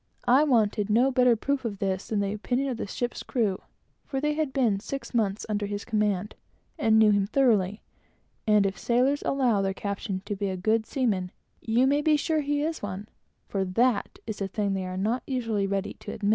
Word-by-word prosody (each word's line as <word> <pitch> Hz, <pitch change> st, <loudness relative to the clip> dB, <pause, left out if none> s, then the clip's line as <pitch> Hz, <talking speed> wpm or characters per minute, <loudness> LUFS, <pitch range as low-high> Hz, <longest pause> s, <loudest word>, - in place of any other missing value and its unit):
I 260 Hz, +5 st, +6 dB
wanted 220 Hz, -7 st, +2 dB
no 240 Hz, +5 st, +4 dB
better 250 Hz, -2 st, +4 dB
proof 275 Hz, +4 st, -1 dB
of 215 Hz, -4 st, -3 dB
this 190 Hz, -1 st, -2 dB
than 210 Hz, -2 st, 0 dB
the 200 Hz, 0 st, -1 dB
opinion 250 Hz, +6 st, -1 dB
of 250 Hz, -, -3 dB
the 220 Hz, -, -4 dB
ship's 240 Hz, +4 st, -3 dB
crew, 215 Hz, -7 st, -1 dB, 0.4 s
for 270 Hz, -, -3 dB
they 300 Hz, +2 st, 0 dB
had 305 Hz, -2 st, -1 dB
been 235 Hz, -8 st, +1 dB
six 275 Hz, +6 st, -6 dB
months 210 Hz, -3 st, 0 dB
under 210 Hz, -1 st, -1 dB
his 205 Hz, 0 st, -4 dB
command, 210 Hz, -3 st, 0 dB, 0.5 s
and 220 Hz, -6 st, +4 dB
knew 220 Hz, -1 st, +6 dB
what 200 Hz, -1 st, +1 dB
he 275 Hz, -, +3 dB
was; 195 Hz, 0 st, -1 dB, 0.7 s
and 210 Hz, -2 st, +5 dB
if 195 Hz, 0 st, -2 dB
sailors 255 Hz, +4 st, +2 dB
allow 250 Hz, -7 st, +1 dB
their 195 Hz, 0 st, -1 dB
captain 200 Hz, -1 st, -4 dB
to 205 Hz, -, -3 dB
be 200 Hz, 0 st, -2 dB
a 185 Hz, -, -3 dB
good 220 Hz, +4 st, +1 dB
seaman, 205 Hz, -9 st, 0 dB, 0.3 s
you 235 Hz, +3 st, +2 dB
may 285 Hz, +2 st, +3 dB
be 305 Hz, 0 st, +3 dB
sure 315 Hz, +1 st, 0 dB
he 290 Hz, 0 st, 0 dB
is 320 Hz, +1 st, -2 dB
one, 205 Hz, +1 st, -6 dB, 0.4 s
for 195 Hz, -1 st, -1 dB
that 215 Hz, +4 st, +1 dB
is 215 Hz, -3 st, -6 dB
a 195 Hz, -, 0 dB
thing 200 Hz, 0 st, -1 dB
they 190 Hz, -1 st, -2 dB
are 185 Hz, 0 st, -5 dB
not 220 Hz, +6 st, 0 dB
always 225 Hz, -6 st, -1 dB
ready 195 Hz, 0 st, -2 dB
to -, -, -7 dB
say. 205 Hz, -, -1 dB
215 Hz, 215 wpm, -27 LUFS, 200-255 Hz, 0.7 s, I